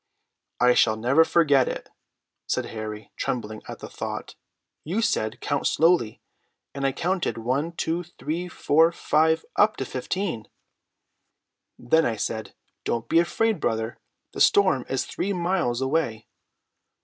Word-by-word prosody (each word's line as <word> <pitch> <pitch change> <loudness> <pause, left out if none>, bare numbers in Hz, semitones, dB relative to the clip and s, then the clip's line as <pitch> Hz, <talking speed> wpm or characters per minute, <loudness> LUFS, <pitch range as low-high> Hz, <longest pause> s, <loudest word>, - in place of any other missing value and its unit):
"I 125 0 +5
shall 110 - +4
never 130 +8 +4
forget 145 -6 +3
it," - - -5 0.6
said - - 0
Harry, 110 -1 -6
trembling 110 -3 -3
at - - -7
the - - -8
thought. - - -6 0.5
"You 180 +8 -2
said, 110 - 0
'Count 145 -1 0
slowly'; 165 -10 +2 0.5
and 140 -1 -1
I - - +1
counted 175 +4 -1
one, 135 +8 -1
two, 165 +1 -1
three, 175 0 -5
four, 165 -1 +3
five, 160 -1 +2
up 215 +1 +4
to 135 - -3
fifteen." 130 - -3 1.3
"Then 160 +7 +3
I 115 - -1
said: 110 +1 -4 0.3
'Don't 115 -1 -2
be 165 - +5
afraid, 215 +4 +1
brother; 110 -3 -2 0.3
the - - -4
storm 185 -11 +4
is 135 -1 -1
three 200 +2 -2
miles 170 -9 0
away.'" 130 -6 -1
145 Hz, 135 wpm, -25 LUFS, 120-170 Hz, 1.3 s, I